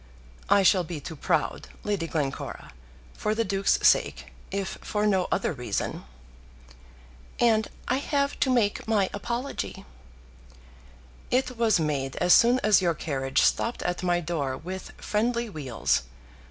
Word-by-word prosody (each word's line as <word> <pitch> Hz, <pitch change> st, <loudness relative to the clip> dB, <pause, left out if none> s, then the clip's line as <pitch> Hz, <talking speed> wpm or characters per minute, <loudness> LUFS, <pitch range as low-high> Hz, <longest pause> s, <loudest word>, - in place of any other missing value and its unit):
"I 200 Hz, -1 st, +5 dB
shall 185 Hz, -1 st, +5 dB
be 165 Hz, -2 st, -6 dB
too 160 Hz, +3 st, -8 dB
proud, -, -, -1 dB, 0.2 s
Lady 200 Hz, -5 st, -1 dB
Glencora; 145 Hz, -5 st, -4 dB, 0.4 s
for 215 Hz, 0 st, -1 dB
the 230 Hz, -, +1 dB
Duke's 195 Hz, -1 st, +1 dB
sake, -, -, +1 dB, 0.2 s
if 195 Hz, -1 st, -4 dB
for 210 Hz, 0 st, -1 dB
no 190 Hz, -3 st, +2 dB
other 185 Hz, -, 0 dB
reason." 125 Hz, -, -3 dB, 1.3 s
"And 220 Hz, -2 st, +3 dB, 0.2 s
I 255 Hz, -, +2 dB
have 280 Hz, 0 st, -1 dB
to 265 Hz, -, +2 dB
make 230 Hz, -6 st, +1 dB
my 205 Hz, -4 st, +2 dB
apology." 240 Hz, +6 st, -4 dB, 1.4 s
"It 255 Hz, 0 st, +1 dB
was 225 Hz, -5 st, +3 dB
made 140 Hz, -4 st, -1 dB
as 180 Hz, 0 st, +4 dB
soon 245 Hz, +2 st, +6 dB
as 210 Hz, -2 st, +5 dB
your 170 Hz, -3 st, +1 dB
carriage 135 Hz, -4 st, 0 dB
stopped 235 Hz, -, +1 dB
at 175 Hz, 0 st, -2 dB
my 175 Hz, -1 st, +1 dB
door 150 Hz, -6 st, -2 dB
with 185 Hz, +5 st, -7 dB
friendly 235 Hz, +1 st, -1 dB
wheels. 135 Hz, -, 0 dB
195 Hz, 140 wpm, -26 LUFS, 160-230 Hz, 1.4 s, soon